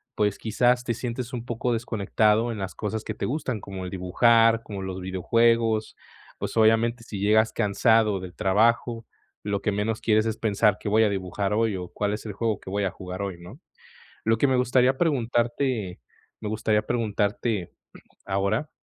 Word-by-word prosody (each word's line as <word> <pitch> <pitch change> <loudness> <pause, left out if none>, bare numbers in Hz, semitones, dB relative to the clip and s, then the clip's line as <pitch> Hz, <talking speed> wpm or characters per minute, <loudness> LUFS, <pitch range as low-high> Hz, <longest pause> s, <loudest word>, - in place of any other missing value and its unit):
pues, 105 -2 +1
quizás 125 +3 +1
te 115 - 0
sientes 120 +1 -5
un 120 -2 -4
poco 120 0 -1
desconectado 110 0 +1
en - - -6
las 95 -1 -4
cosas 110 +1 -4
que - - -4
te - - -4
gustan, 130 -5 -2
como 95 -2 -7
el 90 - -6
dibujar, 115 +5 +3
como 100 -2 -7
los 95 -1 -5
videojuegos. 110 +4 +1 0.4
Pues, - - -4
obviamente, 115 +2 +3
si 105 -4 -7
llegas 110 +2 +3
cansado 105 -2 +2
del 90 -1 -8
trabajo, 115 +4 +1 0.4
lo 100 -1 -2
que 105 0 0
menos 110 +2 -1
quieres 110 -1 +2
es 110 -1 -2
pensar: 105 -1 +2
"¿Qué - - -7
voy 110 +2 +4
a 105 - +3
dibujar 100 +1 -2
hoy 110 -1 +1
o 90 -1 -6
cuál 105 0 -2
es 105 - -6
el 105 - -4
juego 110 -1 -1
que - - -9
voy 100 +1 -1
a 95 - -1
jugar 90 +1 -7
hoy?", 100 -3 -3
¿no? 100 - -12 0.6
Lo 115 0 +2
que 140 - +3
me 130 - +2
gustaría 125 +1 +3
preguntarte 120 - 0 0.4
me 110 - -5
gustaría 110 -1 +1
preguntarte 105 -3 -1 0.5
ahora, 100 +8 -1
110 Hz, 180 wpm, -25 LUFS, 100-115 Hz, 0.6 s, voy